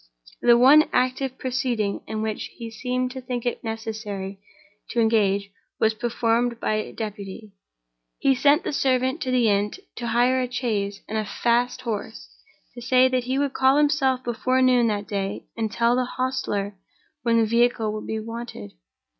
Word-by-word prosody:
The 240 Hz, -1 st, +6 dB
one 280 Hz, +5 st, +7 dB
active 255 Hz, +1 st, 0 dB
proceeding 245 Hz, -5 st, -1 dB
in 220 Hz, 0 st, -3 dB
which 220 Hz, -1 st, -3 dB
he 230 Hz, -2 st, -7 dB
seemed 250 Hz, +2 st, -2 dB
to 260 Hz, 0 st, -7 dB
think 250 Hz, -1 st, -4 dB
it 245 Hz, -, -2 dB
necessary 215 Hz, -3 st, -5 dB, 0.5 s
to 240 Hz, -, -1 dB
engage 200 Hz, -3 st, +2 dB, 0.3 s
was 220 Hz, 0 st, +3 dB
performed 235 Hz, +1 st, 0 dB
by 215 Hz, -2 st, -1 dB
deputy. 210 Hz, -1 st, -6 dB, 0.7 s
He 270 Hz, -, +3 dB
sent 285 Hz, +5 st, +3 dB
the -, -, -3 dB
servant 260 Hz, +1 st, +1 dB
to 255 Hz, -, -2 dB
the 250 Hz, -2 st, +3 dB
inn 205 Hz, 0 st, +1 dB, 0.2 s
to 240 Hz, -, -4 dB
hire 245 Hz, +3 st, +3 dB
a 250 Hz, -1 st, -3 dB
chaise 205 Hz, -6 st, -2 dB
and 220 Hz, +1 st, -2 dB
a -, -, -1 dB
fast 240 Hz, +3 st, 0 dB
horse, -, -, -5 dB, 0.4 s
and 240 Hz, -, -9 dB
to -, -, -8 dB
say 255 Hz, 0 st, +5 dB
that 255 Hz, -1 st, 0 dB
he 260 Hz, +1 st, -1 dB
would 280 Hz, -1 st, 0 dB
call 265 Hz, +1 st, +4 dB
himself 280 Hz, -4 st, +2 dB
before 250 Hz, +2 st, 0 dB
noon 250 Hz, -2 st, +4 dB
that 205 Hz, -2 st, -2 dB
day 200 Hz, -2 st, -3 dB
and 220 Hz, -2 st, -2 dB
tell 235 Hz, +3 st, +2 dB
the 255 Hz, 0 st, +1 dB
hostler 225 Hz, -6 st, -2 dB, 0.4 s
when 230 Hz, -1 st, +2 dB
the 225 Hz, -, +4 dB
vehicle 230 Hz, -1 st, +2 dB
would 215 Hz, -, -6 dB
be 220 Hz, -, -2 dB
wanted. 230 Hz, -, -7 dB
235 Hz, 170 wpm, -24 LUFS, 215-255 Hz, 0.7 s, one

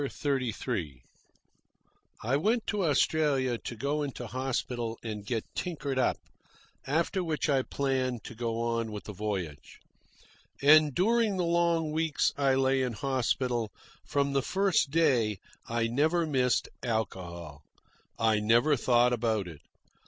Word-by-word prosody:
CHAPTER 140 Hz, -1 st, -1 dB
XXXIII 85 Hz, -, -4 dB, 1.2 s
I 125 Hz, +5 st, +1 dB
went 220 Hz, -, +1 dB
to 205 Hz, -2 st, -1 dB
Australia 140 Hz, -5 st, +2 dB
to 120 Hz, -, -6 dB
go 140 Hz, +6 st, -1 dB
into 135 Hz, -4 st, -4 dB
hospital 120 Hz, -1 st, -3 dB
and 105 Hz, -3 st, -5 dB
get 110 Hz, +1 st, -2 dB
tinkered 145 Hz, -7 st, -3 dB
up, 130 Hz, -, +2 dB, 0.7 s
after 170 Hz, +6 st, 0 dB
which 160 Hz, -3 st, -1 dB
I 140 Hz, -3 st, +3 dB
planned 130 Hz, -4 st, -1 dB
to -, -, -8 dB
go 115 Hz, 0 st, -3 dB
on 115 Hz, -1 st, -1 dB
with 105 Hz, -1 st, -6 dB
the 105 Hz, -, -8 dB
voyage. 95 Hz, -7 st, -5 dB, 0.8 s
And 150 Hz, -1 st, +6 dB
during 220 Hz, +1 st, +2 dB
the 180 Hz, -, 0 dB
long 170 Hz, -2 st, +1 dB
weeks 160 Hz, -1 st, +1 dB
I 135 Hz, -2 st, +2 dB
lay 135 Hz, 0 st, +2 dB
in 125 Hz, -2 st, -1 dB
hospital, 125 Hz, -2 st, -1 dB, 0.3 s
from 140 Hz, -1 st, 0 dB
the 135 Hz, -, +2 dB
first 190 Hz, -1 st, +1 dB
day 125 Hz, -, +2 dB, 0.3 s
I 115 Hz, 0 st, 0 dB
never 155 Hz, +8 st, +1 dB
missed 130 Hz, -5 st, +1 dB
alcohol. 85 Hz, -, -4 dB, 0.6 s
I 110 Hz, -2 st, +2 dB
never 120 Hz, +8 st, +4 dB
thought 125 Hz, -1 st, +3 dB
about 110 Hz, -5 st, 0 dB
it. 80 Hz, -4 st, -11 dB
130 Hz, 135 wpm, -29 LUFS, 115-150 Hz, 1.2 s, And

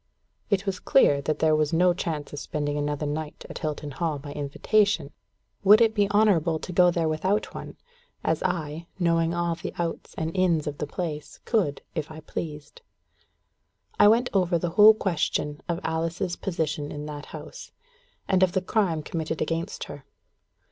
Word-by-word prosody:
It 200 Hz, -2 st, +1 dB
was 190 Hz, -2 st, -2 dB
clear 145 Hz, -, +4 dB
that 150 Hz, +2 st, -1 dB
there 155 Hz, 0 st, +3 dB
was 155 Hz, -1 st, +1 dB
no 175 Hz, +2 st, +4 dB
chance 155 Hz, -5 st, -4 dB
of 145 Hz, -, -4 dB
spending 145 Hz, -1 st, -3 dB
another 145 Hz, 0 st, -2 dB
night 150 Hz, +1 st, -4 dB
at -, -, -7 dB
Hilton 150 Hz, -2 st, -4 dB
Hall 155 Hz, +1 st, -2 dB
by 145 Hz, +1 st, -8 dB
invitation: 150 Hz, +3 st, +1 dB, 0.5 s
would 205 Hz, +2 st, +8 dB
it 225 Hz, -2 st, +4 dB
be 205 Hz, -2 st, +2 dB
honourable 195 Hz, -6 st, +3 dB
to 180 Hz, -, -7 dB
go 180 Hz, 0 st, +6 dB
there 170 Hz, -2 st, 0 dB
without 185 Hz, +7 st, 0 dB
one, -, -, -8 dB, 0.5 s
as 160 Hz, -1 st, 0 dB
I, 165 Hz, -2 st, -2 dB
knowing 170 Hz, -2 st, +2 dB
all 170 Hz, 0 st, 0 dB
the 165 Hz, -, -6 dB
outs 170 Hz, -1 st, -4 dB
and 160 Hz, +2 st, -3 dB
ins 175 Hz, -5 st, +2 dB
of 145 Hz, -1 st, -5 dB
the 150 Hz, -, -2 dB
place, 150 Hz, -2 st, -5 dB
could, 185 Hz, -, 0 dB
if 155 Hz, -3 st, -3 dB
I 155 Hz, 0 st, -9 dB
pleased? 155 Hz, -, -7 dB, 1.2 s
I -, -, +8 dB
went 235 Hz, +4 st, +4 dB
over 180 Hz, -3 st, +2 dB
the 170 Hz, 0 st, -2 dB
whole 215 Hz, +4 st, +8 dB
question 150 Hz, -6 st, -1 dB
of 170 Hz, 0 st, 0 dB
Alice's 165 Hz, +3 st, -2 dB
position 155 Hz, -5 st, -3 dB
in 150 Hz, 0 st, -6 dB
that 150 Hz, -1 st, -7 dB
house, -, -, -10 dB, 0.6 s
and 190 Hz, -1 st, +2 dB
of 185 Hz, -1 st, +4 dB
the 190 Hz, -, +1 dB
crime 185 Hz, -7 st, 0 dB
committed 160 Hz, 0 st, -3 dB
against 165 Hz, +4 st, -2 dB
her. -, -, -9 dB
165 Hz, 175 wpm, -26 LUFS, 150-185 Hz, 1.2 s, would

